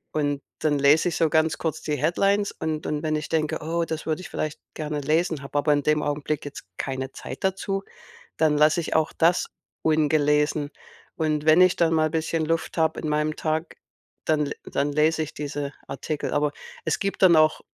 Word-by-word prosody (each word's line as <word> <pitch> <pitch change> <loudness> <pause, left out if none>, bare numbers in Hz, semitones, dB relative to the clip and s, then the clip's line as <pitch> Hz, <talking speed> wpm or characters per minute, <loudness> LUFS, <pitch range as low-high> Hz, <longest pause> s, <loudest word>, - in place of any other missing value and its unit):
Und 145 -2 0 0.2
dann 150 -2 +1
lese 150 +5 +5
ich 165 - -4
so 165 - +3
ganz 160 0 +2
kurz 160 -2 -3
die 150 -1 -1
Headlines 195 +7 +1
und 155 -1 -4
und 150 +1 -2
wenn 155 -1 0
ich 150 - -4
denke: 155 -2 0
„Oh, 165 +2 -1
das 160 -1 -5
würde 160 +2 -1
ich - - -9
vielleicht 155 -1 -3
gerne 150 -1 -3
lesen“, 160 +1 0
habe 140 - -4
aber 145 +1 +2
in 145 -1 +2
dem 150 0 +2
Augenblick 145 +1 -2
jetzt 145 -9 -8
keine 130 0 -4
Zeit - - -8
dazu, 195 +1 -1 0.5
dann 155 -2 +3
lasse 155 +2 +4
ich 165 - -3
auch 160 -1 +2
das 170 +2 +2 0.4
ungelesen. 150 -1 +2 0.4
Und 155 -1 -1
wenn 160 +3 +6
ich 185 0 +5
dann 165 -1 +2
mal 155 -1 +3
bisschen 160 0 -1
Luft 165 +1 -1
habe 160 -1 +1
in - - -4
meinem 150 0 0
Tag, 155 +1 -2 0.5
dann 150 -2 +2
le 145 - -3
dann 140 +1 -1
lese 155 +2 +2
ich 155 - -4
diese 145 -1 -4
Artikel. 150 +2 -4
Aber 145 0 +1 0.3
es - - +1
gibt 195 0 -2
dann 180 -3 +7
auch 155 0 +4
155 Hz, 200 wpm, -25 LUFS, 150-160 Hz, 0.5 s, dann